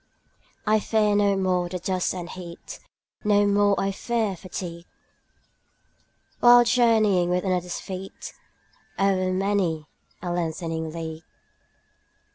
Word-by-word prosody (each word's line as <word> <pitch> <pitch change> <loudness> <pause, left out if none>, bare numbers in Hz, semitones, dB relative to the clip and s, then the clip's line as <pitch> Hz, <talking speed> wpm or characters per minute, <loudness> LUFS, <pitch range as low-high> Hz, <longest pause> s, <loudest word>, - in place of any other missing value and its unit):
I 215 0 +3
fear 210 -1 +1
no 200 -1 +3
more 180 -2 0
the 180 - -3
dust 185 +1 -1
and 175 -2 -5
heat, 175 -1 -9 0.4
25 - - -31
No 205 -1 +4
more 205 0 +3
I 195 - 0
fear 220 -1 -1
fatigue, 175 -1 -7 1.5
While 240 0 +8
journeying 225 -7 +3
with 180 0 0
another's 180 -2 -1
feet 190 0 -8 0.6
O'er 190 -1 +1
many 185 -5 0 0.3
a 175 -1 -4
lengthening 165 -1 -3
league. 160 -1 -6
185 Hz, 115 wpm, -25 LUFS, 175-205 Hz, 1.5 s, While